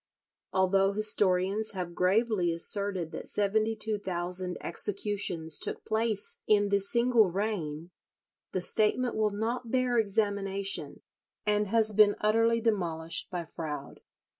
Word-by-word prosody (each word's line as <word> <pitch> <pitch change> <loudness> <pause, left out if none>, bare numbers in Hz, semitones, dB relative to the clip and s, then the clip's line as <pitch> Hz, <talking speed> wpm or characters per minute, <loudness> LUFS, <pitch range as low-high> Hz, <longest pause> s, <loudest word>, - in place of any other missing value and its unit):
Although 195 +1 +2
historians 205 0 +1
have 180 -3 -5
gravely 190 0 +1
asserted 185 0 0
that - - -8
seventy 215 +2 0
two 215 -1 -3
thousand 180 -1 -1
executions 185 -4 0
took - - -4
place 220 -2 -1
in 205 -1 +3
this 200 0 +2
single 235 -4 +3
reign, 175 -5 -4 0.6
the 185 - -2
statement 225 +6 +2
will 215 -1 +1
not 230 +4 -3
bear 250 -1 +1
examination, 200 -2 -1 0.4
and 210 0 +1
has 220 +1 +2
been 205 0 +5
utterly 225 +2 +2
demolished 170 -7 -1
by 175 -2 -4
Froude. 150 -4 -7
205 Hz, 120 wpm, -29 LUFS, 180-220 Hz, 0.6 s, been